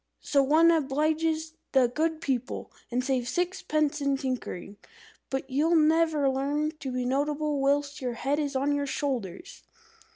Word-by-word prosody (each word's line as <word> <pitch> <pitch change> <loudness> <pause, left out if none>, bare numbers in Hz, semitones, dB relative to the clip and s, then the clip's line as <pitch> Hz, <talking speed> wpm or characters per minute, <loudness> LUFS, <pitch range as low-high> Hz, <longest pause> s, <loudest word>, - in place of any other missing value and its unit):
So 280 - +2
one 315 +5 +5
obliges 315 +2 0 0.2
the 260 -3 +5
Good 315 +5 -1
People, 260 -4 -3 0.2
and 250 +1 -1
saves 255 -2 0
sixpence 310 -5 0
in 280 -1 +1
tinkering. 250 -7 -4 0.5
But 265 0 -3
you'll 300 +6 +2
never 315 -2 +3
learn 285 +3 0
to 265 - -4
be 250 0 -2
notable 290 +2 0
whilst 285 +1 0
your 250 -2 -2
head 275 +5 -1
is 290 -2 -2
on 280 +2 +1
your 285 0 -1
shoulders." 270 - -4
285 Hz, 150 wpm, -28 LUFS, 265-310 Hz, 0.5 s, one